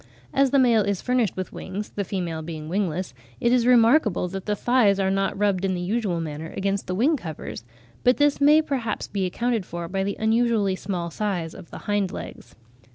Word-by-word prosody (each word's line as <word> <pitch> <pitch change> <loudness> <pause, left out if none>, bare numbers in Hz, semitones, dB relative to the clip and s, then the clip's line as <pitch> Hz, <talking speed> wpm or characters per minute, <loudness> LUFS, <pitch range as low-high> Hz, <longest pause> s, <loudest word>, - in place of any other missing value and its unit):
As 275 0 +3
the 280 - +3
male 240 -4 +5
is 200 -2 -1
furnished 250 -7 0
with 185 - -4
wings 200 +3 -6
(the 200 - -2
female 175 -4 -3
being 155 -1 -7
wingless), 180 -3 -2 0.3
it 235 - +2
is 245 -1 +3
remarkable 235 - +4
that 195 +2 -6
the 210 - +1
thighs 215 -3 +3
are 190 0 +1
not 195 0 0
rubbed 200 -2 +1
in 190 -1 +1
the - - -3
usual 195 -2 -1
manner 160 0 -5
against 195 0 -1
the 180 - -2
wing 275 - +3
covers; 160 - -7 0.4
but 250 +1 +4
this 290 -1 +2
may 300 +2 +6
perhaps 250 -8 -2
be 195 -2 -1
accounted 235 +3 -1
for 170 -1 -6
by 190 +2 -1
the 200 0 -3
unusually 220 -3 +2
small 180 -3 -4
size 180 -5 -2
of 185 - -12
the - - -9
hind 205 -3 0
legs. - - -9
200 Hz, 205 wpm, -24 LUFS, 180-235 Hz, 0.4 s, may